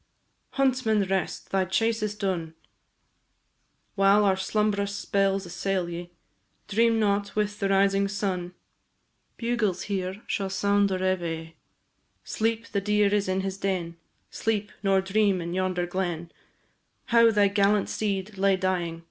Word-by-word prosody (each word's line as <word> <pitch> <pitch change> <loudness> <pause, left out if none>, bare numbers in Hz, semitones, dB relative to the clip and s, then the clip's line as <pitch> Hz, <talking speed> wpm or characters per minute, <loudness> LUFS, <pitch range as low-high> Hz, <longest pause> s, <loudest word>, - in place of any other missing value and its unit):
Huntsman, 255 -6 +2
rest! 190 -1 -2
thy 195 -1 +2
chase 225 +4 0
is 210 -1 -2
done; 180 -6 -3 1.4
While 200 +1 +4
our 190 -1 +3
slumbrous 200 +1 0
spells 195 -1 0
assail 180 +1 -2
ye, 175 +1 -6 0.6
Dream 225 +2 +3
not, 205 -1 0
with 210 -1 -1
the 195 - 0
rising 195 0 +3
sun, 185 -3 -3 0.8
Bugles 230 -6 -1
here 190 +1 -4
shall 195 -2 -2
sound 200 +1 +2
reveillé. 175 -4 -2 0.7
Sleep! 225 +1 -1
the 200 - -1
deer 210 0 +2
is 205 -2 +1
in 190 +1 0
his 195 0 -4
den; 180 -4 -2 0.4
Sleep! 215 -2 -1
nor 195 -1 +3
dream 195 0 +1
in 170 0 -4
yonder 185 -1 0
glen, 175 -2 -3 0.8
How 230 -1 +7
thy 205 -2 +4
gallant 200 0 +2
steed 200 -1 -3
lay 195 0 +4
dying. 180 -3 -1
195 Hz, 130 wpm, -26 LUFS, 185-210 Hz, 1.4 s, How